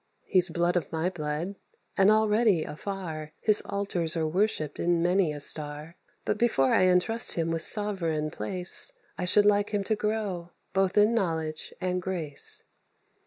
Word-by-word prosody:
He's 185 -2 +3
blood 175 +2 0
of 170 -5 -2
my 165 +3 -1
blood, 165 +3 -4 0.4
and 195 +1 +4
already, 215 -4 +3
afar, 155 -2 -6
His 215 -1 +5
altars 180 -5 -1
are 160 - 0
worshipped 155 -3 -1
in 170 -1 +1
many 180 -2 +2
a 150 - -6
star; 150 +2 0 0.3
But 210 - -1
before 135 - +2
I 185 - +4
entrust 185 +6 +2
him 165 -1 -1
with 165 0 -1
sovereign 170 -7 +1
place, 180 - 0 0.3
I 180 - -1
should 205 +3 +4
like 205 0 +3
him 205 -2 -1
to 220 +2 0
grow, 210 -5 -3 0.2
both 190 0 0
in 210 +2 +5
knowledge 160 -7 -2
and 180 -1 -2
grace." 175 -6 -2
180 Hz, 160 wpm, -27 LUFS, 160-205 Hz, 0.4 s, His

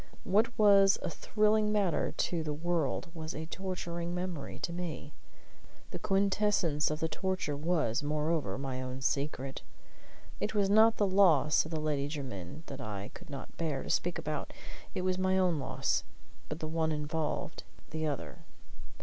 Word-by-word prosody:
What 220 +5 +2
was 200 -2 +6
a - - -2
thrilling 215 0 +2
matter 200 -6 +1
to 165 +1 -1
the 150 -2 -2
world 170 0 -1
was 160 -1 -5
a 155 - -4
torturing 175 -1 -4
memory 180 -5 -4
to 170 - -1
me. 165 -4 -5 0.8
The - - -4
quintessence 195 -5 +2
of 155 +1 -3
the 160 - +2
torture 185 -4 -2
was, 150 -6 +1
moreover, 150 0 0
my 130 -1 -3
own 130 0 -5
secret. 135 -1 -1 0.8
It 215 - -2
was 200 -1 +3
not 220 +2 +6
the 205 - +3
loss 180 -8 +5
of - - -6
the 160 -1 -2
Lady 150 -2 0
Jermyn 135 - -6
that 135 -1 -7
I 105 -4 -5
could 180 -2 -12
not 140 -1 -8
bear 150 -5 -1
to - - -3
speak 175 0 +1
about; 150 -1 -4 0.4
it 185 - -1
was 185 0 +1
my 185 0 +2
own 180 -4 +3
loss; 135 - 0 0.5
but 150 - -3
the 155 - -2
one 160 0 0
involved 150 0 -2 0.3
the 155 0 -1
other. 85 - -4
160 Hz, 165 wpm, -32 LUFS, 145-185 Hz, 0.8 s, was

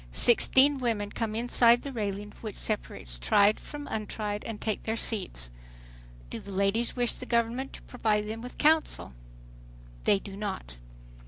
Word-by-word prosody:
Sixteen 265 - +5
women 220 -5 -1
come 220 -2 -3
inside 240 0 +4
the 280 - -5
railing 205 -3 -4
which 215 -3 -6
separates - - -2
"tried" 200 - +4
from 290 -1 -8
"untried" 210 -2 -4
and 225 -2 -5
take 215 -3 -2
their 225 - -2
seats. 180 - -1 0.8
"Do - - -4
the 200 - -10
ladies 200 +5 0
wish 245 -1 +1
the 255 - -9
government 235 +3 0
to - - -11
provide 210 -4 -1
them 220 +1 -5
with 250 +1 -9
counsel?" 310 - +2 0.9
They 200 - +5
do 195 0 -9
not. 195 - -5
220 Hz, 155 wpm, -28 LUFS, 200-240 Hz, 0.9 s, Sixteen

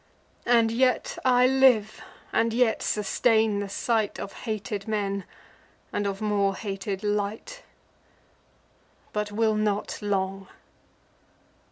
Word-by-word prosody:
And 230 -2 +4
yet 255 +2 +1
I 250 -1 +5
live, 255 -5 +3 0.3
and 225 0 +2
yet 240 -2 +2
sustain 220 0 +1
the 200 -1 -4
sight 220 +1 -1
Of 200 - -6 0.2
hated 205 -1 -4
men, 200 -3 -2 0.7
and 205 0 -1
of 195 0 -4
more 200 -2 +1
hated 195 -1 -4
light: 210 - -2 1.5
But 210 0 -2
will 220 +1 +2
not 210 0 -1
long." 195 -1 -2
210 Hz, 110 wpm, -26 LUFS, 200-225 Hz, 1.5 s, I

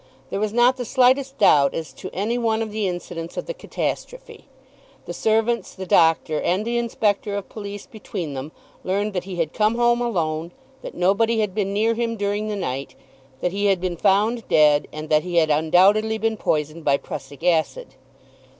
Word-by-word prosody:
There 195 - -2
was 215 0 -1
not 240 +3 +3
the 250 - -3
slightest 260 +3 +2
doubt 145 -8 +4
as 160 -1 -5
to - - -8
any 210 +5 -2
one 225 -2 0
of 220 - -6
the 210 -2 -1
incidents 175 -2 -6
of - - -3
the - - -4
catastrophe. - - -5 0.6
The - - -6
servants, 225 +2 0
the 190 - -6
doctor, 160 -3 +3
and 190 +5 0
the 235 +1 0
inspector 210 -3 -1
of 200 - -5
police 205 -1 -7
between 180 -8 -6
them, 135 +3 -6 0.3
learned 200 +3 -1
that 180 - -3
he 190 -2 -6
had 165 -3 -2
come 215 +1 +2
home 240 0 +2
alone, 170 -7 -2 0.3
that - - -8
nobody 215 +6 +2
had 210 -3 -1
been 200 -1 -1
near 220 +3 +2
him 230 0 -2
during 205 +1 -1
the 210 - -2
night, 135 -8 -4 0.5
that 180 - 0
he 200 +2 0
had 195 -2 +2
been 180 -1 -2
found 210 +6 +1
dead, 150 -1 +4
and 155 0 -7
that 155 -1 +4
he 175 +1 -5
had 160 -2 +3
undoubtedly 190 +8 +3
been 225 0 0
poisoned 155 -4 -2
by 140 -2 +3
prussic 135 0 -9
acid. 180 - +1
200 Hz, 190 wpm, -22 LUFS, 165-225 Hz, 0.6 s, doubt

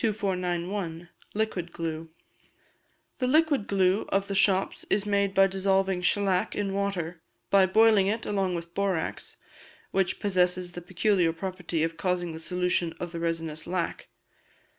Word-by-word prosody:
2491. 180 -4 -2 0.3
Liquid 200 -6 -2
Glue. 165 -1 -5 1.1
The 255 - +1
liquid 295 -5 +3
glue 190 0 +2
of 195 0 0
the 200 - -3
shops 195 0 +2
is 205 0 +2
made 200 -1 +1
by 195 - +7
dissolving 190 -1 +1
shelac 190 0 +1
in 200 -2 -2
water, 180 -4 -2 0.3
by 195 -1 +6
boiling 215 0 +5
it 220 +2 -1
along 195 -3 0
with 170 0 -6
borax, 195 -5 -2 0.5
which 190 -2 0
posesses 180 -2 +1
the 175 - -7
peculiar 180 0 +1
property 175 -2 -3
of 165 0 -2
causing 175 -1 -1
the 160 - -7
solution 180 0 -1
of 175 -1 -5
the 170 - -5
resinous 165 -2 -3
lac. 175 -1 -3
185 Hz, 140 wpm, -27 LUFS, 170-200 Hz, 1.1 s, by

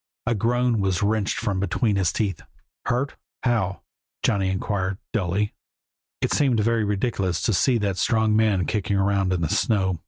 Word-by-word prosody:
A 120 - +1
groan 120 +2 +1
was 95 -1 0
wrenched 105 -1 0
from 100 -5 -1
between 105 +2 0
his 95 -4 +2
teeth. 100 -6 -2 0.5
"Hurt? 130 +4 -1 0.3
How?" 110 -6 0 0.4
Johnny 95 -2 +2
inquired, 95 0 -1 0.2
dully. 105 0 0 0.7
It - - 0
seemed 130 -6 +2
very 115 +1 +2
ridiculous 100 -4 -1
to 110 - +2
see 125 +6 +3
that 100 -3 -1
strong 110 0 +2
man 105 -5 +2
kicking 100 -2 -1
around 95 -1 +1
in 90 -2 0
the 80 - +1
snow. 95 -6 +1
100 Hz, 160 wpm, -24 LUFS, 95-115 Hz, 0.7 s, see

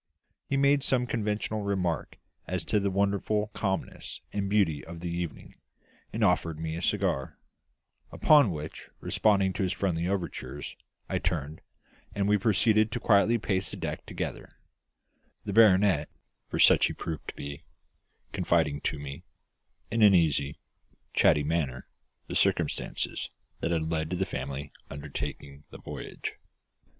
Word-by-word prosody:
He 140 - +1
made 140 +1 +4
some 130 -2 +2
conventional 110 -2 -1
remark 95 -4 -1 0.3
as - - -2
to 105 - +2
the 100 0 0
wonderful 100 +2 0
calmness 95 -2 -3
and 100 -1 -1
beauty 95 -8 +2
of 85 0 -9
the 85 0 -4
evening, 85 -2 -5 0.6
and 110 +1 -1
offered 85 -5 +2
me 80 0 -3
a 85 - -4
cigar; 90 -9 0 0.7
upon 145 -7 +5
which, 75 -2 -6
responding 100 -3 +2
to - - -3
his 95 -2 +1
friendly 85 -3 -1
overtures, 75 -8 -4 0.3
I - - -1
turned, 80 -3 -2 0.5
and 100 -1 +1
we 105 0 +4
proceeded 110 +1 +3
to 125 - -2
quietly 110 +1 +4
pace 95 -3 -1
the - - -6
deck - - -5
together; - - -5 1.0
the 100 - -3
baronet 95 -7 +5 0.4
for - - -3
such - - +6
he - - -4
proved 80 -2 -6
to - - -6
be 70 +2 -7 0.7
confiding 70 -1 +1
to - - -1
me, 70 -1 -7 0.7
in 115 - +1
an 105 -2 +8
easy, 75 -4 +2 0.6
chatty 75 - +4
manner, 70 -5 -1 0.4
the - - -7
circumstances - - 0 0.3
that - - -1
had 80 -1 0
led 80 -1 -1
to 90 - -1
the 95 +2 0
family 70 -2 -5 0.2
undertaking 70 0 -6
the - - -10
voyage. - - -6
95 Hz, 145 wpm, -29 LUFS, 80-105 Hz, 1.0 s, an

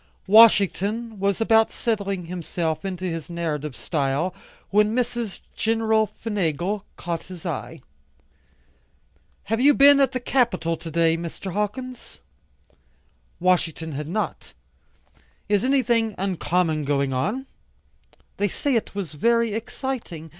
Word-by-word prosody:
Washington 215 +1 +4
was 200 0 0
about 225 0 +4
settling 200 -5 -2
himself 170 -1 -3
into 185 -1 -4
his 165 -4 -4
narrative 155 -5 -3
style, 140 - -1 0.4
when 210 +2 +3
Mrs. 240 -4 -2
Gen. 225 +1 +1
McFingal 210 -4 0 0.2
caught 170 -2 -4
his 180 -2 -11
eye. - - -5 1.6
"Have 225 +3 -1
you 285 +1 +6
been 280 0 +7
at 275 - +3
the 255 - -2
Capitol 240 -10 +1
to 165 - -8
day, 165 0 +2
Mr. 170 +2 -6
Hawkins?" 245 +5 -4 1.2
Washington 165 -3 +1
had 150 +1 -5
not. 210 +6 -3 0.9
"Is 205 -1 +2
anything 240 -5 +2
uncommon 175 -4 0
going 140 -1 0
on?" 210 - -1 0.9
"They 205 - +1
say 280 +8 -1
it 225 -4 -1
was 185 -7 -4
very 230 +7 +2
exciting. 225 - -5
195 Hz, 120 wpm, -24 LUFS, 165-225 Hz, 1.6 s, been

